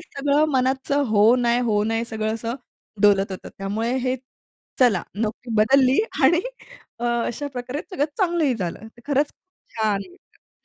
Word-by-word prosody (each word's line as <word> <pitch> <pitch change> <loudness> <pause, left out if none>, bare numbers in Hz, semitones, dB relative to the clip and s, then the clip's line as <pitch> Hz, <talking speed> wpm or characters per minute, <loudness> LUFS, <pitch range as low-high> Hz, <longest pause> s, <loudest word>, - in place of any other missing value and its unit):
सगळं 285 +2 +1
मनाचं 265 +2 +1
हो 215 +3 +5
नाही, 240 -1 +2
हो 215 -4 +1
नाही, 225 +1 0
सगळं 220 -1 -2
असं 230 +1 -4 0.5
डोलत 200 -1 +4
होतं. 185 - -8
त्यामुळे 210 +5 -2
हे 255 0 -1 0.6
चला 230 -9 +4
नोकरी 220 +3 -4
बदलली 260 +4 +4 0.3
आणि 335 +5 +5 0.6
अ, - - -3
अशा 235 +3 -1
प्रकारे 250 +3 -4
सगळं 325 -7 0
चांगलंही 340 -7 +2
झालं. 195 0 -5 0.2
खरंच 285 +1 +2
खूप 370 - -37
छान 215 -3 +1
होतं 360 - -27
240 Hz, 145 wpm, -23 LUFS, 215-275 Hz, 0.6 s, हो